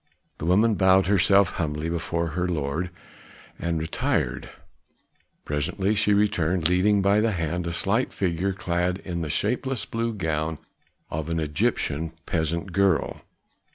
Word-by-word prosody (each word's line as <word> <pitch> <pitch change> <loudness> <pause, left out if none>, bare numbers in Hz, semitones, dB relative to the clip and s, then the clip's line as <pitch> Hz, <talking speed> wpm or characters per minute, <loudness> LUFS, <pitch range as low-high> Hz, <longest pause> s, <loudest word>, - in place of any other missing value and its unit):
The 80 - -3
woman 105 +6 +4
bowed 95 -1 +4
herself 100 -1 +4
humbly 75 -1 -2
before 85 0 -2
her 90 +3 -1
lord 80 +1 -2 0.7
and 85 -1 -1
retired; 80 +1 -1 1.0
presently 80 +8 0
she 105 0 +2
returned, 90 -5 +2
leading 95 +3 +3
by 100 +2 +4
the 110 0 +1
hand 85 0 -2
a - - -2
slight 105 +9 +1
figure 95 0 -1
clad 90 -1 -1
in 85 -2 -3
the 80 - -3
shapeless 130 - -1
blue 115 0 -2
gown 80 -3 -2 0.5
of 80 +1 -3
an 80 0 -1
Egyptian 75 +1 -1
peasant 85 +2 -1
girl. 95 -1 +1
90 Hz, 135 wpm, -25 LUFS, 80-100 Hz, 1.0 s, woman